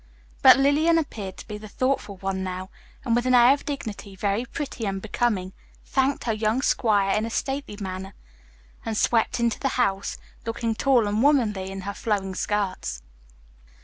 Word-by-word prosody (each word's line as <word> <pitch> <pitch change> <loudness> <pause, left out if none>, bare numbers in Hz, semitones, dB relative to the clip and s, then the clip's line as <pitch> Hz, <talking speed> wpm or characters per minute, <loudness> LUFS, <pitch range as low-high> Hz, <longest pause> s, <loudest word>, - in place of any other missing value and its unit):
But - - +9
Lillian 295 +5 +4
appeared 210 - -4
to - - -10
be 210 -1 -6
the 215 - -9
thoughtful 255 -3 -1
one 190 0 -3
now 185 0 -5 0.3
and 230 -2 +2
with 240 +1 +1
an 255 - +5
air 245 +2 +7
of 280 - -5
dignity, 215 -8 -5
very 200 +5 -1
pretty 255 -4 -4
and 195 0 -2
becoming, 205 -3 -1 0.3
thanked 265 +1 +1
her 230 - 0
young 215 +4 0
squire 205 -7 +2
in 215 - +1
a 225 - -2
stately 270 -2 -3
manner 190 0 -6 0.7
and 220 -1 -3
swept 230 +1 +2
into 235 -2 +1
the 275 - 0
house, 200 -5 0 0.3
looking 230 0 -2
tall 245 0 +3
and 210 +2 0
womanly 225 -9 +2
in 195 0 -6
her 200 +2 -4
flowing 200 -3 -2
skirts. 185 - -2
215 Hz, 175 wpm, -25 LUFS, 195-250 Hz, 0.7 s, But